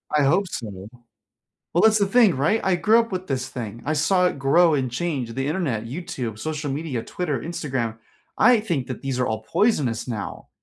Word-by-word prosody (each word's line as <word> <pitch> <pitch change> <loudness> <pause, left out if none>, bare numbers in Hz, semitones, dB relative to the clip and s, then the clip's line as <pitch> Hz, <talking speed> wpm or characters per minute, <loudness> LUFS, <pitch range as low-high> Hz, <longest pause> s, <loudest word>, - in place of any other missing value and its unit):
I 150 - +4
hope 180 +8 +3
so. 105 - -7 0.9
Well, 175 - +3
that's 220 -1 +5
the 200 - +2
thing 215 - +5
right? 160 +12 +2
I 190 -1 +2
grew 220 +6 +4
up 230 -1 -1
with 185 0 -4
this 130 -2 -2
thing. 115 -3 -6
I 155 - 0
saw 170 +5 +2
it 160 -6 -1
grow 165 +5 +4
and 130 -3 -1
change, 130 -4 -2
the 135 +2 -2
Internet, 145 - -1
YouTube, 125 - -5
social 150 +1 -3
media, 140 -5 -3
Twitter, 150 -4 -3
Instagram, 130 -9 -3 0.4
I 245 -2 +6
think 170 -12 -2
that - - -6
these 135 -2 -3
are 125 - +2
all 110 0 -2
poisonous 130 - +1
now. 110 -5 -6
145 Hz, 200 wpm, -23 LUFS, 125-180 Hz, 0.9 s, I